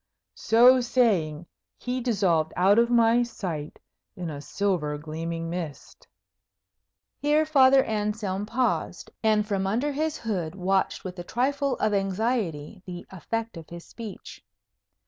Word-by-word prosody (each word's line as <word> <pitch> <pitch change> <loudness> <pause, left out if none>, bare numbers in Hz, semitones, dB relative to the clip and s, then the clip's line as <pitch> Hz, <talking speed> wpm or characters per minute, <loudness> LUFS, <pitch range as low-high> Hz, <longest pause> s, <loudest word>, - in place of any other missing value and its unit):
So 250 +3 +5
saying, 190 -11 +1 0.3
he 250 +1 -3
dissolved 185 -10 +1
out 195 +4 +4
of 235 0 +3
my 235 0 +4
sight 180 -11 -5 0.4
in 175 -4 -5
a 145 -1 -7
silver 160 -4 -1
gleaming 165 +2 -5
mist." 165 -4 -7 1.1
Here 300 +2 +2
Father 270 -3 +5
Anselm 210 -2 -2
paused, 245 +3 -1
and 215 -1 +2
from 195 -2 -1
under 245 +9 0
his 310 +2 -2
hood 185 -7 -3
watched 190 0 0
with 185 -1 -7
a - - -5
trifle 275 +6 0
of 215 -1 0
anxiety 195 -4 -1
the 175 -1 -7
effect 225 +3 -4
of 165 -1 -11
his 170 0 -9
speech. 220 -5 -10
205 Hz, 130 wpm, -26 LUFS, 175-240 Hz, 1.1 s, So